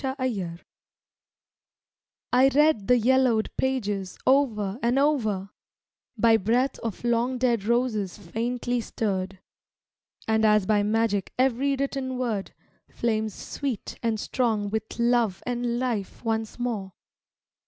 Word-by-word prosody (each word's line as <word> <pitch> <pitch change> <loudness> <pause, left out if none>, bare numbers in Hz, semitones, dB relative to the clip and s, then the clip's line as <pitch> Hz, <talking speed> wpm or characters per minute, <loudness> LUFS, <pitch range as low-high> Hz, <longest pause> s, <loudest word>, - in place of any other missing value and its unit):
©lb 245 -11 -2 1.7
Xetters 265 +2 +5
READ 295 -9 +3
the 250 0 +5
yellowed 245 -2 +3
pages 205 -8 -2
o'er 230 -6 +2
and 240 +3 +2
o'er, 220 -10 +1 0.7
By 225 +1 +5
breath 240 +7 +1
of 230 -2 -5
long 240 +2 +1
dead 240 -5 +1
roses 225 -5 0
faintly 235 +5 -2
stirred; 195 -4 -3 0.9
And 220 0 +2
as 210 -2 +4
by 210 +1 +3
magic 210 -2 0
every 265 +2 +2
written 270 -1 -2
word 225 -6 -3 0.3
Flames 220 -3 -1
sweet 270 -8 -5
and 225 -2 0
strong 220 -4 -1
with 220 0 -4
love 235 -5 +1
and 240 -1 -1
life 240 -3 -3
once 220 -1 -2
more. 220 -6 -3
230 Hz, 115 wpm, -26 LUFS, 210-255 Hz, 1.7 s, Xetters